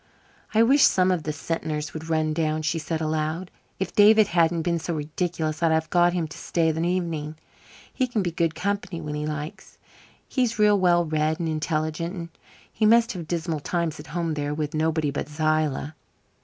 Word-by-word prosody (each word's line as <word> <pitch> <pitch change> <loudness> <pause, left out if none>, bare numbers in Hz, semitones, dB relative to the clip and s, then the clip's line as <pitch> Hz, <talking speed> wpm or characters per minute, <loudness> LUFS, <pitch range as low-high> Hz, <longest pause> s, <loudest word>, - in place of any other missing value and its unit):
"I 225 - +6
wish 275 +5 +4
some 185 -6 +5
of 180 -3 0
the 155 - -3
Sentners 150 +1 -3
would 160 +1 -7
run 155 -1 +1
down," 155 -1 -1
she 160 +2 0
said 160 0 -3
aloud. 155 +3 -2 0.3
"If 190 - -3
David 210 0 +6
hadn't 170 -1 +2
been 170 0 0
so 165 +1 -3
ridiculous 155 +1 -3
I'd 165 -1 +3
have 160 0 0
got 175 0 +4
him 170 -3 -1
to - - -10
stay 165 -2 +1
the 160 +1 -3
evening. 165 -4 -2 0.6
He 255 - 0
can 225 -5 -1
be 175 - -1
good 165 -1 0
company 190 -1 -2
when 150 -2 -5
he 150 0 -3
likes 150 0 -6 0.5
he's 245 -4 0
real 210 -1 +4
well 175 -2 +3
read 155 0 0
and 170 - -1
intelligent. 155 +2 -2
And 170 -1 -6 0.4
he 215 - +2
must 230 +1 +5
have 175 -6 -6
dismal 165 -2 -2
times 165 0 -2
at 150 - -10
home 165 -1 -2
there 145 -1 -2
with 150 0 -3
nobody 155 -1 0
but 145 - -4
Zillah." 155 -1 0
160 Hz, 195 wpm, -25 LUFS, 155-175 Hz, 0.6 s, I